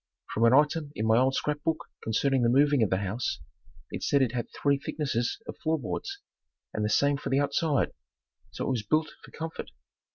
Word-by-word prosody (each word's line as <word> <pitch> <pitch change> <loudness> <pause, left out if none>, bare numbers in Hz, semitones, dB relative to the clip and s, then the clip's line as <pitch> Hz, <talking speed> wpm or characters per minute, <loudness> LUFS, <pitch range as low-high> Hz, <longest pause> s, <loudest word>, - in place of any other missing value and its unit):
From 115 - +3
an 115 - +6
item 150 +1 +2
in 110 - -1
my 110 +1 +5
old 130 +1 +2
scrap 150 0 -1
book 160 0 -1 0.2
concerning 130 +4 +1
the 120 - +3
moving 140 +1 +4
of 110 - +3
the 95 - +2
house, 100 +5 -2 0.5
it - - -5
said 140 -2 +3
it 125 - 0
had 120 -2 -3
three 140 -1 +1
thicknesses 140 -5 -2
of - - -7
floor 160 0 +1
boards, 395 - -4 0.6
and 105 - -1
the 105 - +1
same 140 +6 +3
for - - -5
the 135 - +2
outside, 145 0 +1 0.6
so - - -5
it - - 0
was 125 -4 0
built 155 +9 +1
for - - -13
comfort. 160 0 -6
140 Hz, 205 wpm, -28 LUFS, 115-150 Hz, 0.6 s, an